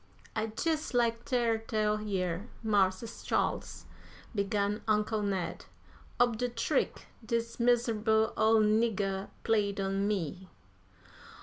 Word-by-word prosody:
"I'd 220 0 -2
jes' 315 -4 0
like 235 -1 +1
ter 235 -3 +1
tell 215 -1 0
yer, 190 -1 -2 0.2
Mars' 205 0 +1
Charles," - - -1 0.5
began 200 0 0
Uncle 215 0 +1
Ned, 195 -3 -2 0.5
"ob 240 -2 +3
de 245 +2 0
trick 235 -1 -1 0.2
dis 230 +1 -2
miser'ble 225 -2 +2
ole 220 0 +4
nigger 210 -3 +1
played 205 -3 +1
on 195 +1 0
me." 185 -2 -3
215 Hz, 110 wpm, -31 LUFS, 200-230 Hz, 0.5 s, ole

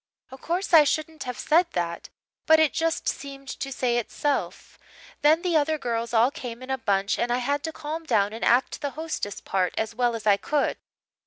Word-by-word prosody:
"Oh 265 - -9
course, 355 +5 -2
I 315 -2 +9
shouldn't 310 +1 -2
have 250 -1 -5
said 335 +3 +3
that. 170 -1 -3 0.4
But 315 0 +7
it 315 -2 +3
just 330 0 -1
seemed 275 -1 -5
to 275 - -5
say 250 -2 0
itself. 280 +4 -3 0.4
Then 315 +4 +4
the 355 -2 0
other 310 +1 +2
girls 235 -4 -3
all 235 +3 +4
came 245 -2 -7
in 260 - -6
a 265 - 0
bunch 200 -2 0
and 240 - 0
I 245 - +2
had 280 +3 -1
to 320 - -3
calm 315 +1 -6
down 210 -6 +1
and 225 - -6
act 245 +2 +2
the 285 - -1
hostess' 310 -11 -4
part 185 -2 -1
as 220 0 -2
well 240 0 +1
as 225 - -7
I 205 -2 +5
could. 295 +6 0
265 Hz, 210 wpm, -25 LUFS, 230-310 Hz, 0.4 s, I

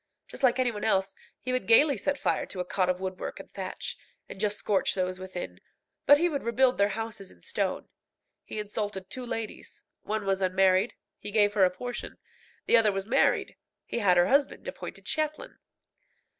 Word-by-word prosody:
Just - - -10
like 255 -2 +4
any 255 -2 +2
one 210 -2 -6
else, 195 -3 +1 0.3
he 255 - -3
would 255 - -1
gaily 280 +5 +7
set 285 +7 -1
fire - - 0
to 190 - -6
a 180 - -1
cot 185 0 0
of 180 0 0
woodwork 185 -1 -5
and - - -12
thatch, - - -5 0.3
and - - -10
just 210 0 +1
scorch 200 -3 +1
those 185 -1 -1
within; 185 -1 -7 0.5
but 290 - +9
he 345 +4 +2
would 290 -5 -2
rebuild 250 +1 +2
their 200 - +5
houses 220 -4 -5
in 85 - -19
stone. - - -2 0.6
He - - -7
insulted 205 -2 -4
two 255 - -5
ladies. 225 -2 -6 0.2
One 215 -1 -3
was 195 0 0
unmarried 190 +2 +3 0.2
he - - -6
gave 205 -1 +3
her 200 -3 +5
a - - +3
portion; 240 +7 -6 0.5
the 235 - +6
other 220 -2 +5
was 195 0 -3
married 260 +5 +2 0.3
he - - -3
had 185 -5 +4
her 175 - +6
husband 280 - +1
appointed - - -7
chaplain. 310 +10 -2
210 Hz, 190 wpm, -28 LUFS, 190-250 Hz, 0.6 s, but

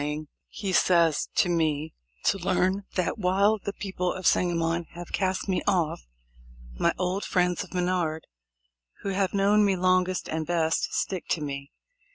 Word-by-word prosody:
ing," 150 +1 -3 0.2
he 195 -3 -4
says, 170 -4 +3
"to - - +4
me 160 -3 0 0.3
to 195 - +2
learn 185 +2 +1
that 185 +4 -1
while 200 +3 +3
the 200 - -4
peo 200 -1 -6
ple 180 0 0
of 185 - -7
Sangamon 170 -1 +2
have 175 0 -8
cast 190 0 -1
me 190 -2 0
off, 165 - 0 0.7
my - - +3
old 185 +2 -1
friends 180 0 +1
of 185 - -14
Menard, 175 -3 -1 0.8
who 200 - -2
have 195 -1 0
known 205 +2 +4
me 200 -2 +3
longest 185 0 +1
and 160 0 -3
best, 165 -2 +1
stick 185 -3 -2
to 165 - 0
me. 140 -1 -5
180 Hz, 165 wpm, -27 LUFS, 165-190 Hz, 0.8 s, to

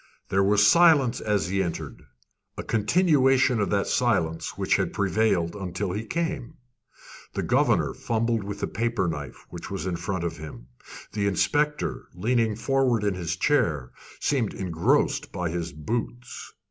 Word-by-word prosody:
There 95 +1 +2
was 105 +1 +4
silence 155 -7 +5
as 100 -5 0
he 95 +1 +1
entered, 85 -3 -5 0.5
a - - -4
continuation 135 - +3
of 100 - 0
that 100 -1 +1
silence 85 -10 0
which - - +2
had - - -1
prevailed 95 -3 +1
until 90 -2 -3
he 105 +4 -4
came. 165 -7 -3 0.8
The - - -1
governor - - +2
fumbled 115 -1 -1
with 100 0 -6
a - - +1
paper 115 -4 -1
knife 75 -5 -6
which - - -8
was - - -4
in 90 -2 -2
front 85 +1 -3
of 85 - -3
him. 75 -6 -9 0.5
The 100 -1 -1
inspector, 150 +9 0
leaning 110 +3 +1
forward 120 0 +1
in 100 -1 +1
his 90 -2 -3
chair, 80 - +1 0.3
seemed 130 -8 0
engrossed 85 -4 0
by 90 -2 -3
his 85 0 -3
boots. 120 +9 -5
105 Hz, 150 wpm, -26 LUFS, 90-120 Hz, 0.8 s, silence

